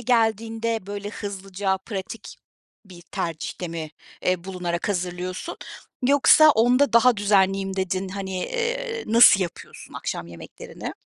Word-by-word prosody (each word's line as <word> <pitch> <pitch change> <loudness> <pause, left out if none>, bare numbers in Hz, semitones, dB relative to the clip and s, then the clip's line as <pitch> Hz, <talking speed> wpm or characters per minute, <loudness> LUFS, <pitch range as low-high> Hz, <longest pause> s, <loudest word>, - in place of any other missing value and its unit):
geldiğinde, 225 -2 0
böyle, 205 0 -5
hızlıca 195 -1 -3
pratik 195 +2 -7 0.5
bir 180 -3 -14
tercihte 170 +1 -5
mi, 160 -2 -6 0.3
eee, 180 -1 0
bulunarak 180 -1 -3
hazırlıyorsun? 180 - -4 0.5
Yoksa 285 +3 +6
onda 250 +2 +3
daha 235 0 +5
düzenliyim 195 -1 +2
dedin. 190 0 -2
Hani, 190 -1 -5
eee, 480 -1 -3
nasıl 225 -3 +7
yapıyorsun 175 -2 -7
akşam 85 - -4
yemeklerini? 85 -1 -9
195 Hz, 115 wpm, -24 LUFS, 185-230 Hz, 0.5 s, nasıl